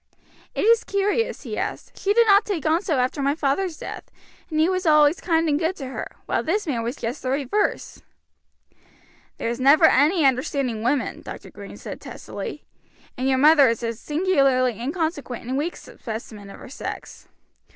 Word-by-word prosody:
"It - - -1
is 460 +1 +4
curious," 410 +3 -1
he - - -7
said, - - -2
"she 395 - -1
did 465 +2 +5
not 405 0 +6
take 370 -8 -3
on 320 +2 +2
so 330 -8 -1
after 255 +3 0
my 280 +1 +1
father's 315 +3 -1
death, - - -8 0.4
and 310 -2 -1
he 315 - +4
was 370 -1 -1
always 300 +1 +5
kind 330 -2 +1
and 295 -1 +1
good 340 +3 0
to 275 - -7
her, - - -7
while - - 0
this 405 +6 -1
man 260 -8 -1
was 235 +2 -3
just 235 +5 -5
the 255 - -3
reverse." 280 +10 -1 1.4
"There's 235 +1 -3
never 280 +5 +6
any 310 +3 +4
understanding 260 -3 0
women," 255 +4 -1
Dr. - - -9
Green - - -10
said - - -8
testily, - - -7 0.5
"and 260 +1 -1
your 260 - +3
mother 290 -1 +6
is 230 +1 -2
a 230 0 -1
singularly 270 - +1
inconsequent 285 -4 -3
and 255 +2 -3
weak 310 +5 -2
specimen 215 -3 -8
of - - -11
her - - -11
sex. 275 - -8
290 Hz, 180 wpm, -23 LUFS, 255-345 Hz, 1.4 s, not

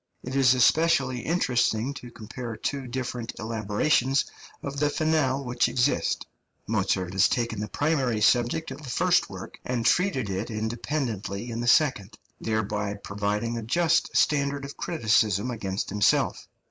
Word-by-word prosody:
It 130 +2 -5
is 130 -2 +5
especially 135 0 +3
interesting 125 -5 0
to 125 -3 -9
compare 115 +1 -7
two 135 +4 -3
different 120 -2 -4
elaborations 115 +5 +1 0.4
of 140 0 -4
the 150 0 +2
finale 145 -3 +1
which 125 0 +1
exist. 130 +3 +1 0.4
Mozart 90 -1 0
has 95 - +4
taken 115 -3 -1
the 105 - -3
primary 135 -5 0
subject 120 +8 +2
of 135 +3 -8
the 140 - -8
first - - +2
work, - - -9
and 120 -2 -2
treated 155 - +2
it 100 +4 -3
independently 110 -1 -3
in 115 - -4
the 120 - -3
second, 115 -7 +2 0.2
thereby 105 -2 -2
providing 105 +3 -2
a - - -5
just 165 +9 +1
standard 140 -1 +1
of 140 - -8
criticism 110 - +1
against 100 -5 -3
himself. 105 0 +1
120 Hz, 145 wpm, -26 LUFS, 110-140 Hz, 0.4 s, is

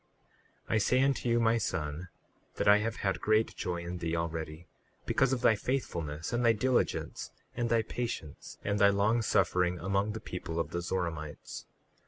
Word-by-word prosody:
38:3 - - -2
I - - +4
say 125 +5 +3
unto 135 -3 +1
you, 120 0 +3
my 115 0 +3
son, 80 -3 -3 0.5
that - - -1
I 105 +1 +8
have 110 +1 -2
had 95 - 0
great 110 +1 +2
joy 85 -1 -3
in 85 +1 -5
thee 85 0 -1
already, 80 -1 -4 0.4
because 135 -1 +2
of 130 -2 0
thy 115 - +6
faithfulness 85 - -3
and 120 +1 +1
thy 115 -1 +6
diligence, 130 +3 0 0.3
and 120 -1 -1
thy 115 -1 +3
patience 115 -11 -5
and 105 0 0
thy 100 -1 +7
long 105 +4 +2
suffering 90 -4 +2
among 100 +4 0
the 110 - -5
people 85 -4 -5
of 85 - -2
the 85 - -2
Zoramites. 85 -4 -4
100 Hz, 180 wpm, -31 LUFS, 85-115 Hz, 0.5 s, I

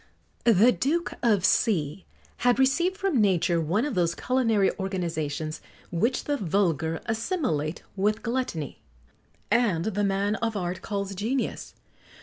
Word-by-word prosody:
The 225 +3 +6
Duke 325 +8 -1
of 210 -6 +3
C 175 -5 +1 0.3
had 245 0 +3
received 340 +8 +2
from 380 - +1
nature 175 -4 +2
one 180 - 0
of 295 - -2
those 170 -3 +1
culinary 230 -6 +2
organizations 160 -5 -3 0.3
which 225 +9 0
the 290 -1 -1
vulgar 165 - 0
assimilate 220 - -1
with 210 +3 0
gluttony, 235 - -3 0.7
and 200 -9 +2
the 205 -1 -1
man 200 +2 +1
of 225 -2 -2
art 180 -1 -3
calls 200 -2 -3
genius. 230 +7 -3
205 Hz, 130 wpm, -26 LUFS, 175-240 Hz, 0.7 s, The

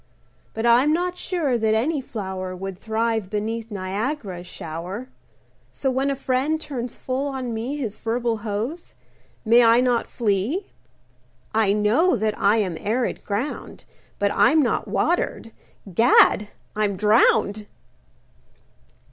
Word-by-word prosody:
But 225 +1 -2
I'm 245 +5 +5
not 355 +2 -1
sure 315 -10 -1
that 220 0 +2
any 280 +6 0
flower 190 -6 -5
Would 190 0 -6
thrive 220 -2 -1
beneath 220 +2 -3
Niagara's 200 -1 -4
shower! 180 +11 -6 0.6
So 265 - -1
when 265 +2 0
a 275 - 0
friend 270 +4 0
turns 250 -6 -5
full 265 +2 -2
on 260 -4 -4
me 235 +6 -3
His 225 -7 -4
verbal 230 0 -1
hose, 220 +10 -5 0.5
may 235 +2 +6
I 230 +1 +6
not 245 -2 +1
flee? 235 - -1 0.8
I 215 -2 +3
know 220 - +3
that 215 0 0
I 205 +2 +4
am 185 -6 -1
arid 235 +4 -1
ground, 225 +8 -4 0.3
But 200 0 +1
I'm 310 0 +4
not 245 - 0
watered—Gad! 225 - +2 0.3
I'm 205 -2 0
drowned! 210 0 +3
225 Hz, 125 wpm, -23 LUFS, 205-260 Hz, 0.8 s, may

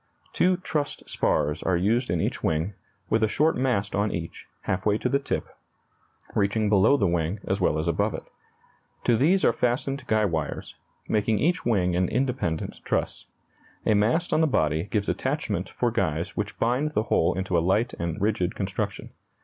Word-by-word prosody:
Two 180 0 +3
trussed 150 -5 -3
spars 75 +1 0
are 90 -2 +1
used 115 +8 +1
in 85 -1 0
each - - -2
wing, 80 +6 0 0.4
with 110 - +3
a 110 - +4
short 155 +9 +2
mast 120 -6 0
on 105 +1 +1
each, 85 -1 -6
half 95 0 -2
way 105 0 +2
to - - -1
the 140 - +2
tip, 140 - -2 0.9
reaching 105 +1 +1
below 105 +7 +5
the 100 - +1
wing 85 +2 0
as 95 +1 0
well 80 - +2
as 80 +2 -2
above 85 - +1
it. - - -8 0.8
To 120 - +3
these 170 - +3
are - - +4
fastened 130 +3 -1
guy 110 -1 +3
wires, 80 -5 -3 0.3
making 110 0 +1
each 165 - +1
wing 90 -6 +2
an 90 0 +1
independent 125 -10 -1
truss. - - -2 0.6
A - - +4
mast 120 +13 +2
on 155 - +3
the 160 - +4
body 80 - +1
gives 105 -1 -1
attachment - - -2
for - - -1
guys 80 +2 -1
which 105 -1 -3
bind 130 +6 0
the 105 - +1
whole 85 -4 +2
into 95 -1 -1
a - - +5
light 105 +7 +1
and 85 -1 -3
rigid 100 -3 0
construction. 95 -1 -3
105 Hz, 180 wpm, -26 LUFS, 90-125 Hz, 0.9 s, below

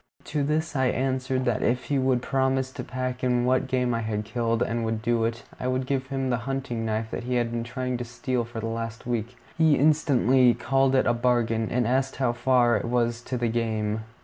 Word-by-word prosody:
To 150 -1 -2
this 155 +2 -1
I 130 -1 +2
answered 130 0 -1
that 120 -3 0
if 125 +1 +1
he 140 -2 0
would 130 -2 +1
promise 130 0 0
to 130 -2 -6
pack 130 0 -4
in 125 -1 +2
what 130 +1 +2
game 125 -1 0
I 115 - 0
had 105 -1 -2
killed, 115 +1 0
and 115 0 -2
would 110 -1 -2
do 120 -1 +1
it, 115 0 -3 0.2
I 125 - -2
would 130 0 0
give 130 0 -1
him 135 -1 -2
the 120 - +2
hunting 135 -4 -2
knife 110 0 -2
that - - -4
he 125 0 -1
had 120 -1 0
been 115 0 -2
trying 125 +1 -3
to 120 - -4
steal 125 +1 -2
for 115 0 -7
the 110 - -4
last 115 0 -4
week. 120 0 -3 0.2
He 160 -2 +5
instantly 135 -4 +4
called 135 0 +2
it 130 - +3
a 120 - +3
bargain, 120 -2 +1
and 125 0 +1
asked 130 +3 0
how 130 -3 +1
far 120 -1 +3
it 105 - -4
was 120 0 0
to 125 +1 -4
the 120 0 0
game. 110 -2 -1
125 Hz, 230 wpm, -26 LUFS, 115-130 Hz, 0.2 s, He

